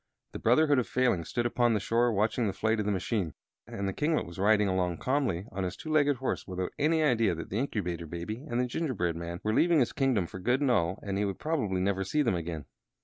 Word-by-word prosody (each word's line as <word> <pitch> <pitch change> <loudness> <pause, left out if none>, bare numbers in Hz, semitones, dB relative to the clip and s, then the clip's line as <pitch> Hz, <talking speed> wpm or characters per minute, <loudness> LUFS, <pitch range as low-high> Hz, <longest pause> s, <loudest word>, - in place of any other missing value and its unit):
The - - -7
Brotherhood 145 +3 +4
of 125 - -1
Failings 120 -11 +1
stood 120 -1 -1
upon 120 -1 +2
the - - +1
shore 115 +3 +2
watching 110 +2 +1
the 100 - -1
flight 110 +2 0
of 105 - -1
the - - +2
machine, 95 - -1 0.3
and 100 0 -4
the 95 - -2
kinglet 155 - 0
was 85 +2 -10
riding 105 +1 +4
along 90 -2 0
calmly 130 -10 0
upon 95 0 -3
his 90 - -4
two 155 - -6
legged 145 -2 +3
horse 130 - -3
without 90 -1 -4
any 155 +2 +3
idea 115 - +2
that 80 - -7
the 105 - 0
Incubator 90 - -3
Baby 85 - -5
and 120 - -1
the 125 - +2
gingerbread 120 - -1
man 85 +1 -6
were 110 - 0
leaving 170 +6 +4
his 125 - +1
kingdom 130 -9 +1
for 95 - -8
good 125 +8 +1
and 140 -3 +2
all 90 -5 +1
and 100 -1 -2
he 105 - +1
would 100 -1 -3
probably 115 - -1
never 95 0 0
see 150 +11 +1
them 115 - +1
again. 85 -4 -4
105 Hz, 245 wpm, -29 LUFS, 90-125 Hz, 0.3 s, Brotherhood